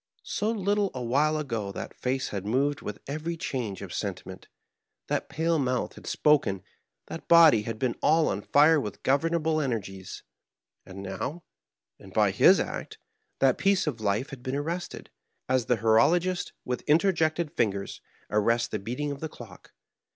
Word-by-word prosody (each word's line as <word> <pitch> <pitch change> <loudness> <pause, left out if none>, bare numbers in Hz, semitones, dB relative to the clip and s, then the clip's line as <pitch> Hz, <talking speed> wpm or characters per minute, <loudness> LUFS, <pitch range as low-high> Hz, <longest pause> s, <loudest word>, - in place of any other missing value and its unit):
So 210 - -2
little 205 -2 +1
a 125 - -4
while 145 +6 +2
ago 115 -9 -3
that - - -6
face 130 +1 -2
had 100 -2 -4
moved 135 +7 0
with 105 - -6
every 155 +4 -4
change 115 - -4
of - - -8
sentiment, - - -5 0.6
that - - -1
pale 160 +3 0
mouth 130 -2 -1
had - - -13
spoken, 135 -11 +2 0.4
that 165 - -8
body 165 -9 +7
had 115 +1 -5
been 125 0 -1
all 160 +1 +4
on 100 - -1
fire 150 +7 +5
with 105 -5 -7
governable 155 +3 +1
energies; 95 - -4 0.6
and 95 +1 -9
now, 135 - -5 0.6
and - - -14
by - - +3
his - - +6
act, - - -4 0.4
that 135 -2 +2
piece 195 -1 +2
of 130 -8 -3
life 105 +7 -1
had 135 -3 -9
been 130 +1 -3
arrested, 165 +5 -4 0.4
as 130 -2 +1
the 125 - +2
horologist, 165 - +2
with 125 0 -2
interjected 160 -1 +2
finger, 100 -3 0 0.5
arrests 115 +3 +2
the 110 - -3
beating 125 +8 -3
of 140 - -6
the 160 - -5
clock. 110 -10 -13
135 Hz, 160 wpm, -27 LUFS, 110-160 Hz, 0.6 s, body